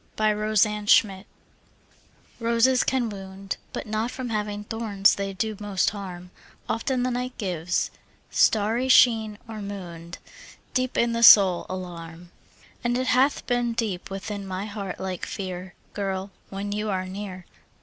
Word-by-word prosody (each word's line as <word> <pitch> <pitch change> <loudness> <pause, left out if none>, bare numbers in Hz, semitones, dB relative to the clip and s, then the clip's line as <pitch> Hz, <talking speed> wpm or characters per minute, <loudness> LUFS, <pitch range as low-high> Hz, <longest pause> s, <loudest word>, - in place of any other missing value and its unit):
Y 215 0 +3
Z - - +1
Roses 215 0 +3
Can 210 -1 +4
Wound 190 +1 -11 1.1
ROSES 235 +2 +3
can 255 -3 0
wound, 195 -1 -6
But - - -5
not 220 +2 -1
from 250 -1 -5
having 210 -1 -2
thorns 210 -3 +2
they 200 0 -3
do 215 +3 -2
most 205 -2 0
harm; 180 -3 -8 0.4
Often 250 +2 -1
the 255 - 0
night 250 +1 -3
gives, 180 -4 -1 0.4
starry 225 +4 +2
sheen 220 -5 +5
or 220 -2 -7
moon'd, 175 -4 -7 0.6
Deep 255 -1 0
in 235 0 +3
the 230 0 -1
soul 195 -6 +8
alarm. 175 -2 -7 0.5
And 240 0 +1
it 255 - 0
hath 265 +3 +2
been 245 -1 0
deep 215 -7 -3
within 195 +1 -5
my 190 +1 -4
heart 205 -3 -6
like 185 -2 -4
fear, 185 -2 -5 0.2
Girl, 195 -1 -3 0.2
when 200 +1 -4
you 210 +1 -2
are 185 -2 -1
near. 185 -1 -7
205 Hz, 150 wpm, -25 LUFS, 190-230 Hz, 1.1 s, soul